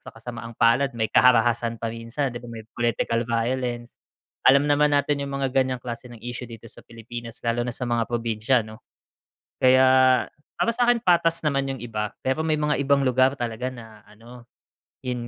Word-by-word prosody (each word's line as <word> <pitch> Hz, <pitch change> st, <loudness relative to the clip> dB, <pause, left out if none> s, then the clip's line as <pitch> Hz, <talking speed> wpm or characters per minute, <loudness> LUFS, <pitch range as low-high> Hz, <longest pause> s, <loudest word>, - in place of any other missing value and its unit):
Sa -, -, -14 dB
kasamaang 115 Hz, 0 st, -9 dB
palad, 125 Hz, +4 st, +3 dB
may 110 Hz, -1 st, 0 dB
karahasan 120 Hz, -2 st, +3 dB
pa 115 Hz, -, -2 dB
minsan, 115 Hz, +4 st, -4 dB
'di 120 Hz, -, -7 dB
ba? 120 Hz, -, -11 dB
May 115 Hz, -1 st, -9 dB
political 120 Hz, 0 st, 0 dB
violence. 120 Hz, 0 st, -2 dB, 0.5 s
Alam 140 Hz, +2 st, +6 dB
naman 145 Hz, 0 st, +3 dB
natin 145 Hz, 0 st, 0 dB
'yung 140 Hz, 0 st, -4 dB
mga 135 Hz, -2 st, -2 dB
ganyang 130 Hz, -1 st, 0 dB
klase 120 Hz, 0 st, -7 dB
ng 120 Hz, -, -11 dB
issue 120 Hz, 0 st, -6 dB
dito 115 Hz, -1 st, -12 dB
sa -, -, -14 dB
Pilipinas 115 Hz, 0 st, -9 dB
lalo 115 Hz, 0 st, 0 dB
na 120 Hz, 0 st, -2 dB
sa 125 Hz, -, -4 dB
mga 120 Hz, -2 st, -1 dB
probinsya, 115 Hz, +1 st, 0 dB
'no? 110 Hz, +1 st, -12 dB, 0.8 s
Kaya 130 Hz, 0 st, +5 dB, 0.3 s
para 230 Hz, -, +2 dB
sa 245 Hz, -, +2 dB
akin, 240 Hz, -1 st, +4 dB
patas 170 Hz, -5 st, +2 dB
naman 140 Hz, -3 st, 0 dB
'yung 135 Hz, -, -6 dB
iba, 105 Hz, -3 st, -4 dB
pero 130 Hz, +4 st, -1 dB
may 155 Hz, -1 st, 0 dB
mga 150 Hz, 0 st, +1 dB
ibang 140 Hz, -1 st, +2 dB
lugar 130 Hz, +1 st, +3 dB
talaga 120 Hz, +1 st, -3 dB
na 110 Hz, -4 st, -13 dB
ano, 120 Hz, +3 st, -15 dB, 0.6 s
'yun 125 Hz, -2 st, -4 dB
120 Hz, 185 wpm, -24 LUFS, 115-135 Hz, 0.8 s, Alam